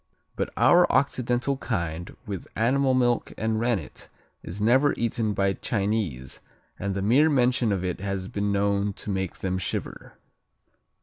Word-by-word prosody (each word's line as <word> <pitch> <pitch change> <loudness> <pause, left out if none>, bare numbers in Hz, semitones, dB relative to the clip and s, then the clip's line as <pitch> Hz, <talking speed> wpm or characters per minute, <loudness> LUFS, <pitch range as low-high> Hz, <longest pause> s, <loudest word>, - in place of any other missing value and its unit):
But - - -2
our 175 0 +5
occidental 125 0 +1
kind 85 -7 -3
with 100 -4 -6
animal 130 +3 +2
milk 120 -2 +1
and 110 0 0
rennet 115 -3 -2 0.3
is 90 +4 -7
never 130 +7 +4
eaten 115 -2 -1
by 100 0 +2
Chinese 100 - -2 0.4
and 100 0 -2
the 100 - -2
mere 135 +10 +4
mention 125 -5 +2
of 95 -2 -1
it 90 - -3
has 95 -1 -3
been 100 +1 -2
known 100 0 +1
to 100 - -6
make 95 -2 -2
them 95 -1 -2
shiver. 95 - -5
105 Hz, 145 wpm, -26 LUFS, 95-120 Hz, 0.4 s, our